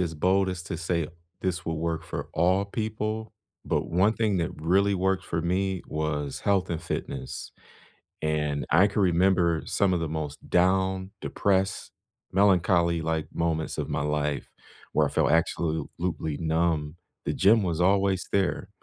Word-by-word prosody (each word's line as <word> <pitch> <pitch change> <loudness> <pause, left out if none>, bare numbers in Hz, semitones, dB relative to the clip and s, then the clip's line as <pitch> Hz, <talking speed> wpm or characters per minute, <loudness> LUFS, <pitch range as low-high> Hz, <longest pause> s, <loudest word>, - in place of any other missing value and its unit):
as 85 -3 -1
bold 95 +4 +2
as 90 -1 -4
to 85 -1 -5
say 85 -2 -1 0.3
this 95 -1 -2
will 80 - -1
work 80 0 -2
for - - -5
all 95 +4 +2
people, 110 0 -3 0.3
but - - -1
one 95 +6 +2
thing 105 -5 +1
that 85 - -1
really 95 +6 +2
worked 95 0 0
for 85 0 -2
me 95 +1 0
was 75 -2 -2
health 95 -3 +1
and 80 - -2
fitness. 65 -1 -5 0.7
And 75 -2 0
I 85 +5 +6
can 105 +1 0
remember 90 -2 +3
some 100 -2 +2
of 90 - +1
the 80 - -1
most 75 -2 -5
down, 95 +1 +2
depressed, 95 -1 0 0.4
melancholy-like 85 -4 +2
moments 80 -2 -1
of 75 - -3
my 70 0 -1
life 75 -1 -1 0.4
where - - +3
I - - -5
felt - - +1
absolutely 80 0 -1
numb. 80 -1 0 0.3
The - - 0
gym 105 +1 +4
was 85 -1 -1
always 95 0 +2
there, 95 0 0
85 Hz, 155 wpm, -27 LUFS, 80-95 Hz, 0.7 s, I